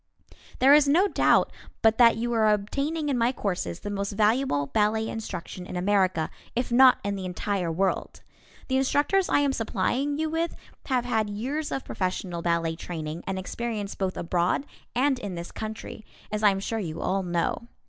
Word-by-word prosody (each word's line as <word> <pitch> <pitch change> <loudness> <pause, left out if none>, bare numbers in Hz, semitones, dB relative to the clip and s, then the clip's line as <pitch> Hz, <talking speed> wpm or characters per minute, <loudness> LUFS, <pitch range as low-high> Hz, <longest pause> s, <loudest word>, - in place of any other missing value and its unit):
There 270 +2 +6
is 295 -1 +6
no 345 +8 +4
doubt - - +3 0.3
but 225 +1 +4
that 230 -2 +7
you 240 +1 -1
are 220 -2 +4
obtaining 280 +10 -1
in 260 -3 +1
my 235 +2 +3
courses 185 -7 -3
the 205 - -5
most 200 0 -3
valuable 215 - +2
ballet 220 +6 +1
instruction 185 -5 -6
in - - -7
America, 185 -3 +1 0.2
if 245 0 -1
not 255 +1 +7
in 200 0 -1
the 190 -1 -5
entire 180 0 -2
world. 190 +3 -1 0.4
The 260 - +1
instructors 290 +8 +2
I - - +3
am 280 -1 +1
supplying 250 +6 -1
you 315 +1 0
with 325 +2 -1 0.3
have 255 -3 +1
had 220 -3 0
years 270 +9 -3
of 270 - -3
professional 185 -2 -3
ballet 170 -1 0
training 160 -1 -6
and 190 0 -2
experience 210 +1 -4
both 190 -1 -3
abroad 175 +9 0 0.3
and 265 +1 +2
in 200 -6 -5
this 170 0 -6
country, 220 0 -7 0.3
as 210 0 -2
I 210 - +6
am 195 -1 0
sure 225 +3 -3
you 165 -5 -4
all 195 +1 0
know. 175 +6 -1
215 Hz, 180 wpm, -26 LUFS, 185-255 Hz, 0.4 s, that